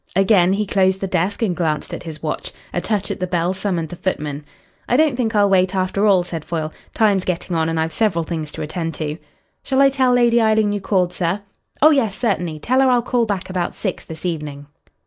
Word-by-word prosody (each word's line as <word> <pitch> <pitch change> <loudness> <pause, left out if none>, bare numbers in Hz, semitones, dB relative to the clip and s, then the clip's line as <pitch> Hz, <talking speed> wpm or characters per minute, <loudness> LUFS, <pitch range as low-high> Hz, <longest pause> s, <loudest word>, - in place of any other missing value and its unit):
Again 190 -1 +4
he 210 +2 0
closed 190 -1 +2
the 195 - -2
desk 185 +4 -1
and 185 -6 0
glanced 155 -4 -2
at - - -5
his 160 -3 -9
watch. 155 - -3 0.2
A 175 - -1
touch 210 -1 -1
at - - -4
the 185 - -1
bell 175 0 0
summoned 185 -4 -2
the 175 - -7
footman. 150 -5 -3 0.5
"I 245 - +3
don't 305 -3 +3
think 230 -3 -1
I'll 205 -1 +5
wait, 190 -1 +2
after 190 +2 +1
all," 190 -3 +4
said 165 -3 -6
Foyle. 155 -2 -3 0.2
"Time's 205 -4 +3
getting 180 -1 -2
on, 160 0 +1
and 165 0 -1
I've 160 0 -1
several 180 -6 +1
things 160 -2 -4
to - - -5
attend 165 +1 -4
to." 150 +1 -4 0.4
"Shall 265 -1 0
I 275 0 +7
tell 260 -2 +2
Lady 240 -1 +4
Eileen 215 -1 +3
you 205 - -3
called, 185 -3 +1
sir?" 180 +3 -1 0.4
"Oh 310 - +8
yes, 230 -9 +1
certainly. 180 -9 -1
Tell 255 - +1
her 265 - +4
I'll 245 -1 +3
call 240 -1 +1
back 195 -2 -2
about 180 -2 -2
six - - -3
this 160 +2 -9
evening." 150 -4 -4
185 Hz, 225 wpm, -20 LUFS, 165-215 Hz, 0.5 s, Oh